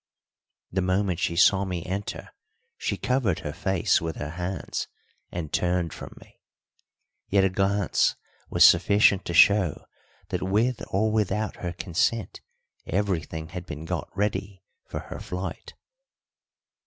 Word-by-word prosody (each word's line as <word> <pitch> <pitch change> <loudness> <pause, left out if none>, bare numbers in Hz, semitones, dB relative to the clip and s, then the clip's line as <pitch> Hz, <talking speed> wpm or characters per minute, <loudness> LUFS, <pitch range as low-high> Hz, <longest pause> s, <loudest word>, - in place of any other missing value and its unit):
The 95 - 0
moment 95 -1 0
she 85 - 0
saw 95 +2 +5
me 90 -3 -4
enter 100 +3 -5 0.4
she - - -2
covered 125 -9 0
her 75 - -5
face 95 -3 +1
with 80 -1 -3
her 75 +1 -5
hands 90 +3 -4 0.4
and 85 -4 -5
turned 90 -2 0
from - - -10
me. - - -20 0.9
Yet 100 0 +4
a 95 - +2
glance 100 +1 +2 0.3
was - - +6
sufficient 100 +2 +5
to 85 - -3
show 95 -3 +5 0.4
that - - -2
with 110 +6 +1
or 110 +3 +1
without 105 -1 0
her 85 -1 -4
consent 95 +4 -1 0.5
everything 85 -5 -2
had 90 0 -7
been 75 +2 -7
got - - -3
ready 100 -1 -2 0.2
for - - -5
her - - -8
flight. 90 +1 -6
95 Hz, 135 wpm, -26 LUFS, 85-100 Hz, 0.9 s, was